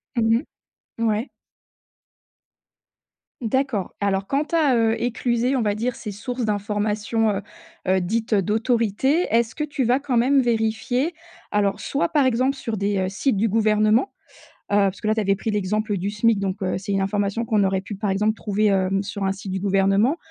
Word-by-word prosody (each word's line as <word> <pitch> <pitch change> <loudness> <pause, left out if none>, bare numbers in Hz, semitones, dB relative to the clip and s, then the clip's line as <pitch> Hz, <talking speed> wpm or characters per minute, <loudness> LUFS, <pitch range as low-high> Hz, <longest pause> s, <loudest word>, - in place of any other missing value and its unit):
Mmh 230 +3 +2 0.6
mh, - - -3
ouais. 215 +5 -1 2.1
D'accord. 235 -4 -1
Alors, 195 -1 0
quand 285 +2 0
tu 335 - -1
as, 295 -6 +3
heu, 225 0 +2
éclusé, 240 +2 0
on 245 - +1
va 205 -2 0
dire, 235 +3 -2
ces 210 - -6
sources 245 +4 -4
d'information, 210 +2 0
heu 195 - -3 0.5
heu, 190 0 +4
dites, 225 +6 -2
heu, 200 - +4
d'autorité, 230 - +1
est-ce 230 0 +2
que 300 - -2
tu 290 -3 -2
vas 250 +3 +2
quand 275 -3 -2
même 270 +4 +4
vérifier? 240 +5 0 0.4
Alors, 200 -1 +1
soit, 280 - 0
par 295 -4 +2
exemple 260 +2 +2
sur 230 -5 -4
des, 200 0 0
heu, 185 0 0
sites 210 +6 0
du 215 +2 +1
gouvernement, 215 - +2 0.6
heu, - - +4
parce 195 - -14
que - - -4
là, 215 - +3
tu 220 - 0
avais 195 -1 +1
pris 220 - -3
l'exemple 210 +1 -1
du 195 +2 -2
SMIC, 210 0 +2
donc 195 0 -3
heu, 185 - 0
c'est 200 +2 -7
une 195 -1 +1
information 205 +3 -1
qu'on 215 -2 +2
aurait 190 0 +1
pu, 205 - -7
par 200 0 -2
exemple, 210 +3 +1
trouver, 210 -1 -1
hem, 195 -1 +2
sur 205 0 -5
un 190 - +1
site 195 0 -7
du 190 - -2
gouvernement, 195 - +2
215 Hz, 190 wpm, -23 LUFS, 200-240 Hz, 2.1 s, heu